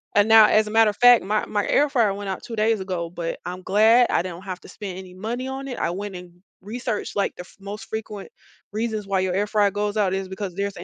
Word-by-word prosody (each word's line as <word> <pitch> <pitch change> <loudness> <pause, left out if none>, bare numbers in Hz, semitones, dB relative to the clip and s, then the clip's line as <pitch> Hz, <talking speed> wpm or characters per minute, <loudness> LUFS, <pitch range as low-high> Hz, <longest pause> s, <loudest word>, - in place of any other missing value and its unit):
And 205 +2 +4
now, 220 -1 +9
as 215 0 +3
a - - -5
matter 225 -1 +5
of - - -17
fact, 245 -3 +7
my 210 +2 0
my 205 -1 -1
air 290 0 +3
fryer 230 -8 +2
went 200 -1 -6
out 190 - -5
2 230 - -7
days 220 0 +1
ago, 180 -3 -4
but 170 -1 -5
I'm 180 +1 -6
glad 225 +5 +5
I - - +2
didn't 180 0 -7
have 185 -2 -6
to - - -14
spend 195 -4 -7
any 185 -1 -11
money 235 +6 -4
on 270 +1 -5
it. 250 - -6
I - - 0
went 195 +2 -5
and 180 -1 -10 0.3
researched 225 +2 -4
like 200 - 0
the - - -8
f 180 - -15
most 205 +3 -8
frequent 215 -2 -6 0.4
reasons 215 -1 -3
why 195 -1 +1
your 185 -1 -1
air 205 +3 0
fryer 205 -2 +2
goes 205 +1 -2
out 195 -3 +2
is 190 -1 -3
because 190 -1 -5
there's 200 0 -3
an - - -7
205 Hz, 265 wpm, -23 LUFS, 190-220 Hz, 0.4 s, now